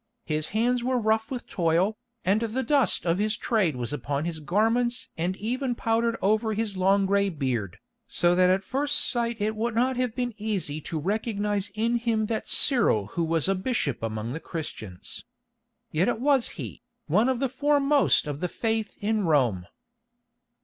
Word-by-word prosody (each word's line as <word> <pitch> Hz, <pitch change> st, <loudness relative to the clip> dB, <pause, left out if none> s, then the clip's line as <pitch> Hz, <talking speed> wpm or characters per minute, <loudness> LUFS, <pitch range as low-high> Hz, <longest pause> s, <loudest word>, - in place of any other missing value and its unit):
His 155 Hz, 0 st, -1 dB
hands 240 Hz, +3 st, +1 dB
were 255 Hz, +1 st, +1 dB
rough 220 Hz, 0 st, +1 dB
with 255 Hz, -2 st, -5 dB
toil, 175 Hz, +4 st, +1 dB, 0.3 s
and 200 Hz, +4 st, +2 dB
the 230 Hz, +3 st, -1 dB
dust 275 Hz, -12 st, +2 dB
of 170 Hz, +2 st, +1 dB
his 210 Hz, 0 st, 0 dB
trade 195 Hz, -, +1 dB
was 125 Hz, +2 st, -3 dB
upon 145 Hz, +2 st, -2 dB
his 170 Hz, -2 st, -3 dB
garments 225 Hz, +9 st, 0 dB
and 180 Hz, +3 st, -2 dB
even 245 Hz, +3 st, -2 dB
powdered 230 Hz, 0 st, 0 dB
over 215 Hz, +2 st, +2 dB
his 215 Hz, -2 st, -2 dB
long 195 Hz, +2 st, +3 dB
gray 200 Hz, +1 st, +2 dB
beard, 130 Hz, -, -3 dB, 0.3 s
so 175 Hz, 0 st, +2 dB
that 180 Hz, 0 st, +4 dB
at 190 Hz, +1 st, +2 dB
first 285 Hz, +6 st, -1 dB
sight 235 Hz, -2 st, +1 dB
it 215 Hz, +1 st, -1 dB
would 225 Hz, +1 st, -2 dB
not 255 Hz, +2 st, +1 dB
have 250 Hz, -3 st, -1 dB
been 245 Hz, -2 st, -2 dB
easy 195 Hz, -9 st, -2 dB
to 160 Hz, -, -5 dB
recognise 205 Hz, +3 st, -1 dB
in 230 Hz, +2 st, +1 dB
him 225 Hz, -2 st, 0 dB
that 220 Hz, 0 st, -3 dB
Cyril 235 Hz, -, +4 dB
who 170 Hz, -, 0 dB
was 165 Hz, 0 st, +1 dB
a 195 Hz, -, +3 dB
bishop 190 Hz, -, -1 dB
among 110 Hz, +1 st, -3 dB
the 160 Hz, -, -4 dB
Christians. 110 Hz, -, -7 dB, 0.7 s
Yet 165 Hz, +4 st, +1 dB
it 240 Hz, -, 0 dB
was 270 Hz, -1 st, +2 dB
he, -, -, -7 dB, 0.2 s
one 210 Hz, -, +3 dB
of 255 Hz, -2 st, 0 dB
the 270 Hz, -, +1 dB
foremost 285 Hz, -, +3 dB
of 145 Hz, -1 st, -4 dB
the 180 Hz, -, -2 dB
Faith 220 Hz, +1 st, -2 dB
in 210 Hz, -1 st, 0 dB
Rome. 125 Hz, -, +2 dB
210 Hz, 175 wpm, -26 LUFS, 165-235 Hz, 0.7 s, that